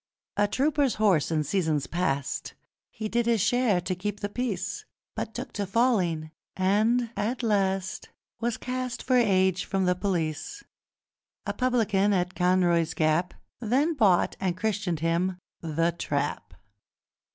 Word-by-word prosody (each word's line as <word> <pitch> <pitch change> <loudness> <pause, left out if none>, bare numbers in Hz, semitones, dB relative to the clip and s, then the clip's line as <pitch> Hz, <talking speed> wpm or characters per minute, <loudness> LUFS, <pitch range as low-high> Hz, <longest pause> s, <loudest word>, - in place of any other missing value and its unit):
A 205 0 +3
trooper's 280 +3 +1
horse 195 -9 +3
in 155 -2 +1
seasons 155 -2 0
past 140 -6 -2 0.3
He 220 -2 -5
did 235 +2 0
his 230 -2 +3
share 225 -2 +2
to 185 +1 -2
keep 205 +3 -4
the 205 - -2
peace, 215 - -3 0.3
But - - -5
took - - -6
to 200 -1 -3
falling, 185 -8 +1 0.3
and 220 +5 +2
at 240 +4 -2
last 195 -3 0 0.3
Was 235 -1 -1
cast 250 -1 -4
for 255 - +2
age 190 -6 +3
from 195 -1 0
the 180 - +3
Police. 180 - -2 0.8
A - - -2
publican 215 -6 +2
at 180 -1 0
Conroy's 175 -3 +2
Gap 155 +3 +1 0.2
Then 260 +8 +1
bought 205 - +3
and 185 -2 -1
christened 190 -5 -1
him 170 +3 0 0.2
The 165 +1 0
Trap. 145 -4 -3
195 Hz, 140 wpm, -27 LUFS, 175-230 Hz, 0.8 s, A